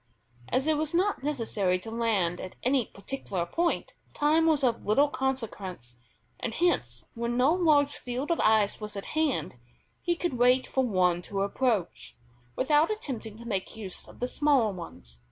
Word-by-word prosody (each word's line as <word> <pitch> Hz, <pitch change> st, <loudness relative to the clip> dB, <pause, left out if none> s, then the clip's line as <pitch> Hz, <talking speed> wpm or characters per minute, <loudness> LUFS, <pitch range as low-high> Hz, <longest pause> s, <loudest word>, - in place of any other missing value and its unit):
As 260 Hz, +2 st, +1 dB
it 310 Hz, -1 st, +2 dB
was 310 Hz, +2 st, -1 dB
not 385 Hz, -1 st, +1 dB
necessary 225 Hz, -10 st, 0 dB
to 205 Hz, +5 st, -8 dB
land 210 Hz, -7 st, 0 dB
at 185 Hz, -, -8 dB
any 255 Hz, -2 st, +2 dB
particular 200 Hz, -5 st, -4 dB
point, 340 Hz, -, -1 dB, 0.2 s
time 315 Hz, +2 st, +3 dB
was 300 Hz, -3 st, +3 dB
of 240 Hz, -3 st, +1 dB
little 280 Hz, +8 st, +4 dB
consequence, 215 Hz, -, -4 dB, 0.4 s
and 230 Hz, -2 st, -3 dB
hence 350 Hz, +1 st, 0 dB
when 235 Hz, 0 st, -2 dB
no 265 Hz, +5 st, +4 dB
large 305 Hz, -5 st, +4 dB
field 255 Hz, +5 st, -3 dB
of 335 Hz, -, +1 dB
ice 215 Hz, -1 st, +3 dB
was 210 Hz, 0 st, -6 dB
at 200 Hz, -, -5 dB
hand, 310 Hz, -, 0 dB, 0.4 s
he 345 Hz, 0 st, 0 dB
could 345 Hz, -3 st, -2 dB
wait 250 Hz, +1 st, +5 dB
for 265 Hz, -, 0 dB
one 180 Hz, -6 st, +2 dB
to 195 Hz, +2 st, -2 dB
approach, 210 Hz, -3 st, -1 dB, 0.4 s
without 295 Hz, +4 st, +3 dB
attempting 245 Hz, -, -5 dB
to 235 Hz, -, -11 dB
make 195 Hz, -4 st, -3 dB
use 195 Hz, -4 st, -5 dB
of -, -, -15 dB
the 245 Hz, -, +1 dB
smaller 265 Hz, -7 st, +2 dB
ones. 85 Hz, -, -10 dB
245 Hz, 170 wpm, -28 LUFS, 200-295 Hz, 0.4 s, wait